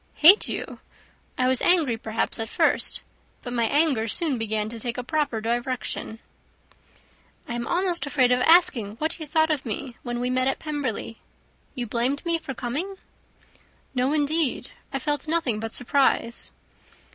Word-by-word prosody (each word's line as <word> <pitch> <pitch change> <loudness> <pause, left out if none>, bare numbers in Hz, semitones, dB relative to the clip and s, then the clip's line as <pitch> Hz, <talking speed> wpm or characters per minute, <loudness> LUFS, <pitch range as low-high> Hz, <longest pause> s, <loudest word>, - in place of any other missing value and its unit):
"Hate 365 +7 +7
you! - - -5 0.6
I 255 - +2
was 260 -1 +2
angry, 325 -9 +4
perhaps, 225 0 -3
at 225 0 -3
first, - - +1 0.4
but 245 - -5
my 235 -1 +1
anger 280 -3 +2
soon 275 +2 0
began 215 -1 -1
to 230 0 -8
take 240 +2 -4
a 250 - -3
proper 290 -4 -1
direction." 240 0 -3 1.3
"I - - -4
am 235 0 -3
almost 350 -3 +1
afraid 255 -3 +3
of 250 - +3
asking 250 - +4
what 315 +7 -3
you 310 - -6
thought 315 +1 +2
of 295 -3 -1
me 240 +2 -5
when 240 -1 -4
we 250 +1 -1
met 255 0 +1
at 270 - +1
Pemberley. 285 -7 -4 0.6
You 245 -2 -3
blamed 245 +7 -1
me 335 -1 +1
for 285 -5 -7
coming?" 300 +13 -3 1.0
"No, 255 +1 +1
indeed, 305 -1 0 0.2
I 275 - -1
felt 295 +3 -2
nothing 305 -9 0
but 225 0 -5
surprise." 245 -2 +1
255 Hz, 160 wpm, -25 LUFS, 235-310 Hz, 1.3 s, Hate